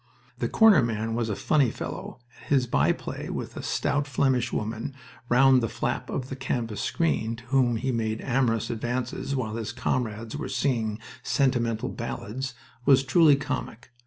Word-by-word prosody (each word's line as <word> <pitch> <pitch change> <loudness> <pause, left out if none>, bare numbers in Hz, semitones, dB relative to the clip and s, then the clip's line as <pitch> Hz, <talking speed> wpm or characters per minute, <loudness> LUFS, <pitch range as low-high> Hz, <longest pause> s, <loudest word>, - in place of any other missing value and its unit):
The - - -1
corner 220 -3 +6
man 115 -1 -1
was 115 -1 -1
a 105 - -1
funny 145 0 +2
fellow, - - -6 0.2
and - - -16
his 135 -3 +3
by 120 - +3
play - - -5
with - - -5
a - - -5
stout 145 0 0
Flemish 130 -2 +1
woman 110 +5 -3 0.3
round 130 +1 +6
the 115 - -1
flap - - -2
of 130 -1 -3
the 135 - -4
canvas 120 -5 -2
screen, 115 -9 0
to 115 - -13
whom 125 -2 +2
he 130 +4 -1
made 110 -2 -1
amorous 120 -4 +1
advances 120 +4 -2
while 115 -5 -2
his 110 -2 -3
comrades 115 -2 -2
were 150 - -4
singing 115 -6 0 0.2
sentimental 120 -5 +1
ballads, 110 - -5 0.3
was 135 0 +5
truly 150 +2 +6
comic. 120 -4 -5
120 Hz, 165 wpm, -26 LUFS, 115-135 Hz, 0.3 s, corner